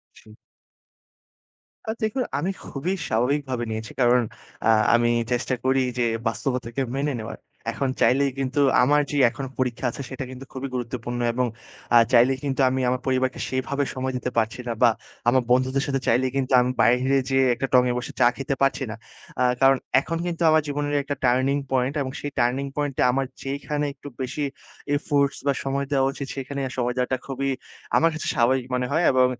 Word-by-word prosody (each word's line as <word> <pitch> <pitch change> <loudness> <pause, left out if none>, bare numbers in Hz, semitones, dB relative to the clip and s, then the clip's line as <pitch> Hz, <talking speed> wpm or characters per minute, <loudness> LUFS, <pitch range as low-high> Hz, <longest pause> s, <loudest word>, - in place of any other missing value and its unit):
সু 110 - -16 1.5
আ - - +1
দেখুন 220 +4 0 0.2
আমি 170 +7 -1
খুবই 155 +7 -3 0.2
স্বাভাবিকভাবে 130 +1 0
নিয়েছি। 110 -1 -5
কারণ 125 0 +5 0.4
আ - - +5 0.3
আমি 120 0 +3 0.2
চেষ্টা 125 +1 0
করি 130 0 +3 0.2
যে 120 - +2 0.2
বাস্তবতাকে 125 +2 -2
মেনে 145 +2 0
নেওয়ার। 110 0 -6 0.3
এখন 135 - -1
চাইলেই 140 +2 +4
কিন্তু 135 +1 0 0.2
আমার 145 +4 +4
যে 145 - -2
এখন 130 +3 -6
পরীক্ষা 125 0 -1
আছে 140 - -7
সেটা 130 0 -5
কিন্তু 130 +1 -9
খুবই 135 +1 -4
গুরুত্বপূর্ণ 120 0 -4
এবং 125 +1 +1 0.5
আ - - +8 0.2
চাইলেই 125 +2 +5
কিন্তু 135 -1 -1
আমি 130 +1 -1
আমার 125 0 0
পরিবারকে 130 0 0
সেভাবে 140 +2 -1
সময় 130 0 -2
দিতে 125 0 -3
পারছি 110 +2 0
না - - 0
বা 120 - +7 0.4
আমার 130 +1 +4
বন্ধুদের 130 +2 +2
সাথে 135 -1 -1
চাইলেই 130 +2 +2
কিন্তু 135 -1 -1
আমি 125 +1 +1
বাহিরে 130 +3 +4
যেয়ে 135 0 +4
একটা 130 +3 -2
টঙে 125 -1 +5
বসে 125 - -6
চা 120 - +6
খেতে 135 +1 -2
পারছি 135 0 +2
না। - - -4 0.5
আ - - +4 0.2
কারণ 135 0 +6 0.2
এখন 165 +4 -4
কিন্তু 175 -1 -3
আমার 155 0 +4
জীবনের 145 0 -1
একটা 145 +1 -3
টার্নিং 130 +3 +3 0.2
পয়েন্ট 130 +1 +1
এবং 130 - -4
সেই 145 - -4
টার্নিং 125 +3 +1
পয়েন্ট 145 -2 -1
এ - - +4
আমার 135 +1 +1 0.2
যেখানে 145 +2 -2
একটু 140 0 -10
বেশি 130 +3 -2 0.5
এফোর্টস 140 -1 +1
বা 140 - +4
সময় 140 +1 -1
দেওয়া 135 -1 +3
উচিত 140 - -6
সেখানে 140 +1 -4
আ - - -11
সময় 125 0 0
দেওয়াটা 125 +1 0
খুবই 135 0 -2 0.5
আমার 165 - +4
কাছে 155 - -4
স্বাভাবিক 125 0 +2
মনে 125 0 0
হয়। 160 +4 +2
এবং 130 -1 +5
130 Hz, 185 wpm, -24 LUFS, 125-140 Hz, 1.5 s, আ